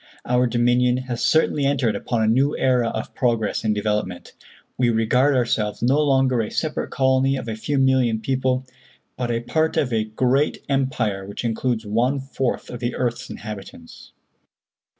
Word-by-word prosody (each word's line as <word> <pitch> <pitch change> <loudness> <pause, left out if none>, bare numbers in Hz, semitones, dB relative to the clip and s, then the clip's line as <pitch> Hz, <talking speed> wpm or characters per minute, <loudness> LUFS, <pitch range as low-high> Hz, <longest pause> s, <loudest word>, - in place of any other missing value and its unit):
Our 125 0 +2
Dominion 125 +1 +2
has 125 -2 -4
certainly 155 -2 +2
entered 135 -5 +1
upon 115 -3 -1
a - - +2
new 135 +6 +2
era 125 -3 +2
of 110 - -5
progress 115 -4 0
and 110 -1 +1
development. 105 -3 -2 0.4
We 125 -1 +2
regard 125 +5 +2
ourselves 115 -4 0
no 135 +5 +3
longer 135 -4 +2
a 105 - -3
separate 155 -2 -2
colony 130 0 +2
of 125 - -6
a 110 - -2
few 140 +6 -2
million 130 -4 +2
people, 130 +2 -1 0.5
but 125 -1 -3
a 115 0 -1
part 155 +6 0
of 125 -4 +1
a 110 -1 +1
great 130 +6 0
empire 130 -8 -1
which 100 +4 -6
includes 115 0 -1
one 120 +6 +1
fourth 135 -1 -3
of 120 - -6
the 120 0 -2
earth's 120 -2 -2
inhabitants. 100 -6 -9
125 Hz, 165 wpm, -22 LUFS, 110-130 Hz, 0.5 s, no